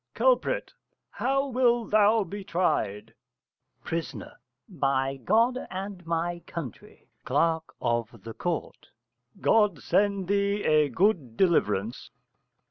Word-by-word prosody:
_ -, -, -59 dB
Culprit. -, -, +1 dB, 0.4 s
How 275 Hz, +1 st, 0 dB
wilt 240 Hz, -3 st, +1 dB
thou 215 Hz, +1 st, +4 dB
be 200 Hz, +2 st, -7 dB
tried? 170 Hz, -, -1 dB, 0.7 s
Pris. 165 Hz, -1 st, -3 dB, 0.5 s
By 135 Hz, -5 st, 0 dB
God 230 Hz, -, +2 dB
and 190 Hz, -1 st, -6 dB
my 170 Hz, +1 st, -1 dB
country. 145 Hz, -9 st, -9 dB, 0.2 s
Cl. 160 Hz, +4 st, +2 dB, 0.2 s
of 120 Hz, -1 st, 0 dB, 0.3 s
Ct. 175 Hz, -2 st, -4 dB, 0.5 s
God 210 Hz, -6 st, +3 dB
send 200 Hz, +4 st, +1 dB
thee 200 Hz, +1 st, +1 dB
a 150 Hz, -1 st, +3 dB
good 155 Hz, -, +1 dB
deliverance. 115 Hz, -, +1 dB
180 Hz, 105 wpm, -27 LUFS, 150-210 Hz, 0.7 s, thou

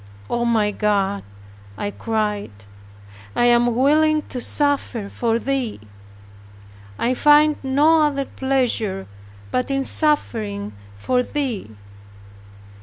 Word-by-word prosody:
"O 240 Hz, 0 st, 0 dB
my 215 Hz, -3 st, +1 dB
Love," 200 Hz, -1 st, +1 dB, 0.6 s
I 205 Hz, -, -3 dB
cried, 210 Hz, -, -3 dB, 0.7 s
"I 240 Hz, -, +3 dB
am 240 Hz, -1 st, +3 dB
willing 305 Hz, +4 st, +3 dB
to 250 Hz, -, -4 dB
suffer 275 Hz, -7 st, -1 dB
for 230 Hz, +1 st, 0 dB
Thee. 260 Hz, -, -2 dB, 1.2 s
I 245 Hz, -, +1 dB
find 295 Hz, +3 st, +5 dB
no 295 Hz, +4 st, +3 dB
other 280 Hz, -2 st, -2 dB
pleasure 245 Hz, -9 st, -1 dB, 0.5 s
but 255 Hz, -, -1 dB
in 275 Hz, 0 st, 0 dB
suffering 215 Hz, -, 0 dB, 0.2 s
for 250 Hz, -, +1 dB
Thee. 245 Hz, -, -4 dB
240 Hz, 105 wpm, -21 LUFS, 210-275 Hz, 1.2 s, find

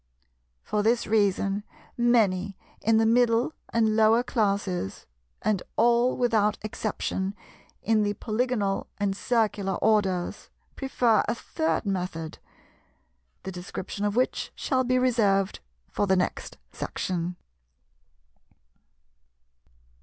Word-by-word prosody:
For 210 Hz, -, -1 dB
this 230 Hz, +3 st, +2 dB
reason 200 Hz, -1 st, +1 dB, 0.3 s
many 205 Hz, -5 st, +2 dB, 0.2 s
in 225 Hz, 0 st, +3 dB
the 225 Hz, -, +3 dB
Middle 235 Hz, +3 st, +3 dB, 0.2 s
and 220 Hz, -2 st, +2 dB
Lower 225 Hz, +2 st, +5 dB
classes, 200 Hz, -, -1 dB, 0.4 s
and 205 Hz, -4 st, +1 dB
all 240 Hz, +2 st, +3 dB
without 220 Hz, -4 st, +2 dB
exception 205 Hz, -2 st, -3 dB, 0.5 s
in 220 Hz, 0 st, +3 dB
the 205 Hz, 0 st, 0 dB
Polygonal 215 Hz, -3 st, -1 dB
and 200 Hz, -2 st, 0 dB
Circular 210 Hz, -4 st, 0 dB
orders, 195 Hz, -5 st, 0 dB, 0.3 s
prefer 245 Hz, -5 st, +2 dB
a -, -, 0 dB
third 315 Hz, +2 st, -2 dB
method, 180 Hz, -5 st, -3 dB, 1.0 s
the 190 Hz, -, -5 dB
description 185 Hz, +2 st, -6 dB
of 205 Hz, 0 st, 0 dB
which 250 Hz, +1 st, 0 dB
shall 260 Hz, -2 st, 0 dB
be 255 Hz, 0 st, +1 dB
reserved 210 Hz, -6 st, +2 dB, 0.3 s
for 205 Hz, -, -1 dB
the 190 Hz, -, +4 dB
next 180 Hz, -, -2 dB
section. 180 Hz, -1 st, -3 dB
215 Hz, 105 wpm, -26 LUFS, 195-235 Hz, 1.0 s, Lower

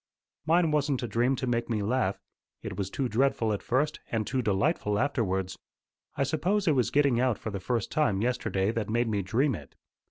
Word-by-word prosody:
"Mine 165 Hz, 0 st, +4 dB
wasn't 145 Hz, -3 st, +1 dB
a -, -, -1 dB
dream 120 Hz, +5 st, +1 dB
to 130 Hz, -, -3 dB
make 120 Hz, -1 st, -1 dB
me 110 Hz, -3 st, 0 dB
laugh. 110 Hz, -3 st, 0 dB, 0.4 s
It -, -, -5 dB
was 100 Hz, -2 st, -3 dB
too 130 Hz, +5 st, -1 dB
dreadful 115 Hz, -2 st, +1 dB
at 100 Hz, -, -3 dB
first, 145 Hz, +5 st, 0 dB
and 110 Hz, -2 st, 0 dB
too 130 Hz, +4 st, -1 dB
delightful 105 Hz, -, +1 dB
afterwards. 95 Hz, -8 st, 0 dB, 0.6 s
I -, -, +1 dB
suppose 175 Hz, +8 st, 0 dB
it -, -, +6 dB
was 125 Hz, -5 st, +2 dB
getting 140 Hz, -4 st, +3 dB
out 125 Hz, -4 st, +2 dB
for 110 Hz, -, -5 dB
the 100 Hz, -, -4 dB
first 115 Hz, +3 st, -2 dB
time 145 Hz, -11 st, +1 dB
yesterday 110 Hz, -4 st, 0 dB
that 115 Hz, -3 st, -3 dB
made 120 Hz, +2 st, +1 dB
me 105 Hz, -3 st, 0 dB
dream 125 Hz, +9 st, +1 dB
it. 75 Hz, -9 st, -9 dB
120 Hz, 200 wpm, -28 LUFS, 105-140 Hz, 0.6 s, it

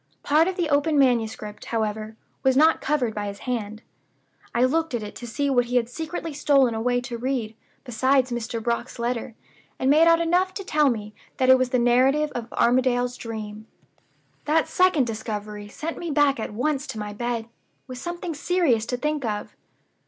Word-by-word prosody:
Part 310 Hz, +3 st, +4 dB
of 375 Hz, -, -1 dB
the 350 Hz, -3 st, 0 dB
open 290 Hz, +2 st, +2 dB
manuscript, 225 Hz, -5 st, 0 dB
however, 220 Hz, -1 st, -3 dB, 0.3 s
was 265 Hz, -1 st, +3 dB
not 315 Hz, +3 st, +5 dB
covered 260 Hz, -7 st, 0 dB
by 210 Hz, -1 st, -3 dB
his 200 Hz, 0 st, -6 dB
hand. 220 Hz, -3 st, -3 dB, 0.7 s
I 240 Hz, -, +3 dB
looked 320 Hz, +1 st, 0 dB
at 230 Hz, -, -3 dB
it 210 Hz, -, -7 dB
to 240 Hz, -, -8 dB
see 280 Hz, +6 st, -1 dB
what 250 Hz, -3 st, +2 dB
he 245 Hz, +1 st, -4 dB
had 240 Hz, -2 st, +3 dB
secretly 320 Hz, +3 st, -5 dB
stolen 275 Hz, -4 st, +3 dB
away 245 Hz, +2 st, 0 dB
to 245 Hz, -2 st, -6 dB
read, 240 Hz, -3 st, -2 dB, 0.3 s
besides 260 Hz, +1 st, +1 dB
Mr. 230 Hz, -1 st, -3 dB
Brock's 235 Hz, +2 st, -2 dB
letter; 235 Hz, -1 st, -3 dB, 0.4 s
and 260 Hz, +1 st, +2 dB
made 320 Hz, +3 st, +6 dB
out 335 Hz, 0 st, +5 dB
enough 360 Hz, +3 st, +1 dB
to 395 Hz, -, -4 dB
tell 300 Hz, -5 st, +3 dB
me 210 Hz, -3 st, -4 dB, 0.2 s
that 260 Hz, 0 st, +2 dB
it 260 Hz, -, +8 dB
was 255 Hz, -1 st, +1 dB
the 255 Hz, -, +1 dB
Narrative 260 Hz, +5 st, +3 dB
of 235 Hz, -1 st, -6 dB
Armadale's 250 Hz, 0 st, +2 dB
Dream. 215 Hz, -2 st, -7 dB, 0.8 s
"That 315 Hz, +1 st, +2 dB
second 365 Hz, -7 st, +3 dB
discovery 210 Hz, -2 st, -5 dB
sent 310 Hz, +10 st, -6 dB
me 340 Hz, -, -4 dB
back 285 Hz, -3 st, +3 dB
at 220 Hz, -, -4 dB
once 275 Hz, +6 st, -1 dB
to -, -, -6 dB
my 210 Hz, 0 st, -5 dB
bed 235 Hz, +1 st, -3 dB, 0.4 s
with 255 Hz, -2 st, -8 dB
something 345 Hz, +1 st, -5 dB
serious 290 Hz, -8 st, +1 dB
to 250 Hz, -, -2 dB
think 300 Hz, +1 st, -2 dB
of. 210 Hz, -3 st, -4 dB
250 Hz, 185 wpm, -24 LUFS, 225-295 Hz, 0.8 s, it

